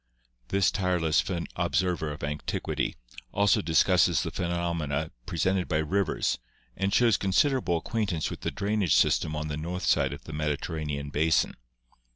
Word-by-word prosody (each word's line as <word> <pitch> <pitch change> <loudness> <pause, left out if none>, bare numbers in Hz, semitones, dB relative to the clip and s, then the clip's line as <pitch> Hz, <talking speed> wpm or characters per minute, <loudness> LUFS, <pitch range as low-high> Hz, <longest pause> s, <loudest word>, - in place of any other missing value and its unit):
This 100 +4 +2
tireless 90 -5 +1 0.3
observer 85 -2 0
of 75 - -8
antiquity 75 0 -2 0.4
also 100 0 +3
discusses 85 +1 +3
the - - -4
phenomena 85 -4 -2 0.2
presented 90 +2 0
by 80 - +1
rivers 95 +5 0 0.4
and 100 0 -1
shows 115 -3 +4
considerable 110 - +2
acquaintance 95 -4 -2
with - - -7
the - - -1
drainage 100 -5 +1
system 75 - +2
on 75 0 -3
the 75 -1 -3
north 85 +4 -4
side - - +3
of - - -8
the - - -9
Mediterranean 75 -1 -3
basin. 80 +3 +2
85 Hz, 140 wpm, -28 LUFS, 75-95 Hz, 0.4 s, shows